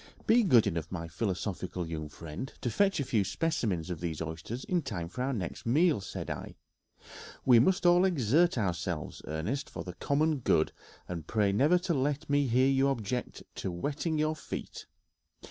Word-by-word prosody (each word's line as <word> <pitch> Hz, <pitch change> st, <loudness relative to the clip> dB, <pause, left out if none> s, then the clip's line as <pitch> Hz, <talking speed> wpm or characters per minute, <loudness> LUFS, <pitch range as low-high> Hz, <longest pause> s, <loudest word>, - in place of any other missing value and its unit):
"Be 235 Hz, +2 st, +5 dB
good 125 Hz, -, +5 dB
enough, 80 Hz, 0 st, -2 dB
my 85 Hz, -3 st, -4 dB
philosophical 90 Hz, -1 st, -3 dB
young 80 Hz, -2 st, -5 dB
friend, 85 Hz, -, -7 dB
to 120 Hz, -, -1 dB
fetch 195 Hz, -, +2 dB
a -, -, +1 dB
few 110 Hz, -5 st, +1 dB
specimens 95 Hz, -, -1 dB
of 85 Hz, -, -4 dB
these 85 Hz, -3 st, -3 dB
oysters 80 Hz, +10 st, -5 dB
in 180 Hz, -2 st, 0 dB
time 90 Hz, -, -4 dB
for 110 Hz, +9 st, -6 dB
our 130 Hz, +2 st, 0 dB
next 100 Hz, -9 st, -4 dB
meal," 150 Hz, -, +3 dB
said 100 Hz, -, -6 dB
I; -, -, -6 dB, 0.9 s
"we 125 Hz, -3 st, +7 dB
must 185 Hz, +9 st, +3 dB
all 175 Hz, +1 st, +6 dB
exert 165 Hz, -, +3 dB
ourselves, 90 Hz, -5 st, -2 dB
Ernest, 105 Hz, -, -3 dB
for -, -, -6 dB
the 90 Hz, -, -7 dB
common 150 Hz, -, +1 dB
good, 80 Hz, -9 st, +2 dB, 0.4 s
and 85 Hz, -3 st, -6 dB
pray 105 Hz, -3 st, +2 dB
never 145 Hz, -, +4 dB
let 145 Hz, +2 st, -1 dB
me 145 Hz, -1 st, +2 dB
hear 130 Hz, +2 st, +4 dB
you 135 Hz, 0 st, +3 dB
object 125 Hz, -2 st, -2 dB
to -, -, -3 dB
wetting 145 Hz, -, -2 dB
your 155 Hz, +1 st, +1 dB
feet. -, -, -7 dB
120 Hz, 175 wpm, -30 LUFS, 90-150 Hz, 0.9 s, we